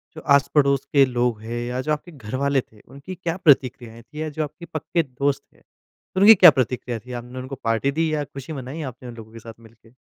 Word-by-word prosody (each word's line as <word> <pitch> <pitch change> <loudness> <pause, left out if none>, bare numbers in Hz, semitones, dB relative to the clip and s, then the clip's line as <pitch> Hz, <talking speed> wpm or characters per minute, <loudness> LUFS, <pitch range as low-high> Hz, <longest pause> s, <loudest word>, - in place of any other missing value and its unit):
जो 155 - -8
आस-पड़ोस 140 -1 +2
के 140 -2 +6
लोग 120 -3 -1
हैं 115 +2 -5
या 125 +1 -3
जो 155 - -3
आपके 150 +4 -6
घरवाले 135 +1 -1
थे 110 -3 -23
उनकी 140 +8 -10
क्या 170 -1 -3
प्रतिक्रियाएँ 130 -7 +2
थीं 120 +6 -12
या 155 - -2
जो 155 +1 -3
आपके 160 +4 -9
पक्के 165 +1 -2
दोस्त 140 0 -2
थे - - -26 0.6
उनकी 205 +4 +9
क्या 180 -2 +9
प्रतिक्रिया 125 -2 -2
थी? 125 +4 -13
आपने 125 +1 -7
उनको 130 +2 -6
पार्टी 115 +4 +1
दी 160 +2 0
या 150 -1 0
खुशी 140 +2 -9
मनाई 135 +3 -6
आपने 125 +1 -12
उन 120 - -10
लोगों 110 -1 -12
के 115 - -10
साथ 115 0 -11
मिलके? 115 0 -20
135 Hz, 220 wpm, -22 LUFS, 120-150 Hz, 0.6 s, उनकी